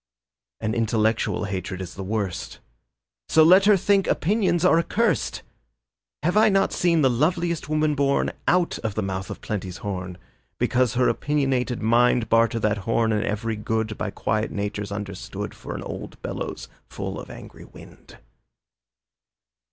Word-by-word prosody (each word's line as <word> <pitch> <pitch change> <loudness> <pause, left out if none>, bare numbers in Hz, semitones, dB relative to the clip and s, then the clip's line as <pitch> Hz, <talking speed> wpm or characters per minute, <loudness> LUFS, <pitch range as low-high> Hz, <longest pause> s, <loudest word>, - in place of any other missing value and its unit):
An 110 -1 -1
intellectual 110 -1 +1
hatred 95 -2 -4
is 95 -1 -6
the 95 - -7
worst, 100 -2 -3 0.7
So 160 - +6
let 185 +5 +7
her 205 -1 +6
think 195 +1 +2
opinions 185 -2 +1
are 165 -2 +5
accursed. 225 +6 0 0.8
Have 175 +4 +1
I 215 +1 +6
not 195 -1 +2
seen 170 -3 +2
the - - +6
loveliest 170 +5 0
woman 155 0 +2
born 140 -1 +1 0.2
Out 175 -1 +2
of 110 -3 -3
the 110 - -1
mouth 95 0 -4
of - - -7
Plenty's 95 -4 -4
horn, 90 -3 -4 0.4
Because 125 -2 +1
of 125 - +1
her - - +4
opinionated 135 -5 0
mind 120 0 +3
Barter 115 0 +3
that 105 -1 +1
horn 115 +3 +1
and 105 -1 +1
every 110 +2 -2
good 110 0 -2
By - - -3
quiet 110 +2 -1
natures 105 0 -4
understood 100 -2 -5
For - - -8
an - - -5
old - - -7
bellows - - -5 0.2
full - - -5
of - - -10
angry - - -11
wind? - - -15
115 Hz, 155 wpm, -24 LUFS, 105-160 Hz, 0.8 s, let